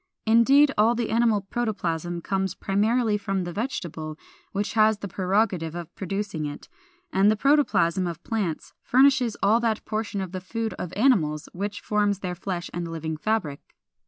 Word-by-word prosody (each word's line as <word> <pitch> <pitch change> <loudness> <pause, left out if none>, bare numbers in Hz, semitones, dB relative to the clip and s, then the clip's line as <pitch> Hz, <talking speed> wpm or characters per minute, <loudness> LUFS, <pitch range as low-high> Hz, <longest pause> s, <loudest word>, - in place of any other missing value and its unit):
Indeed, 265 +6 +5
all 225 +3 +4
the 235 -1 -2
animal 225 -2 +3
protoplasm 175 -6 -2
comes 190 0 -1
primarily 215 +2 +1
from 195 -2 -2
the 175 0 -5
vegetable, 165 - -4 0.3
which 205 +1 -2
has 220 -1 +4
the 205 - -6
prerogative 185 -3 0
of 175 -2 -7
producing 190 -5 -3
it; 145 - -8 0.5
and 195 +2 +4
the 215 - +3
protoplasm 200 - +2
of 170 -2 -6
plants 200 -8 -3
furnishes 260 -3 +3
all 215 +4 +5
that 225 -2 -1
portion 215 -1 -3
of 190 -2 -4
the 185 0 -5
food 225 +4 -3
of 175 - -4
animals 170 - +2
which 200 +3 -4
forms 205 -2 0
their 180 -2 -3
flesh 175 -1 -4
and 175 0 -3
living 160 -1 -4
fabric. 155 -4 -1
200 Hz, 160 wpm, -25 LUFS, 175-225 Hz, 0.5 s, Indeed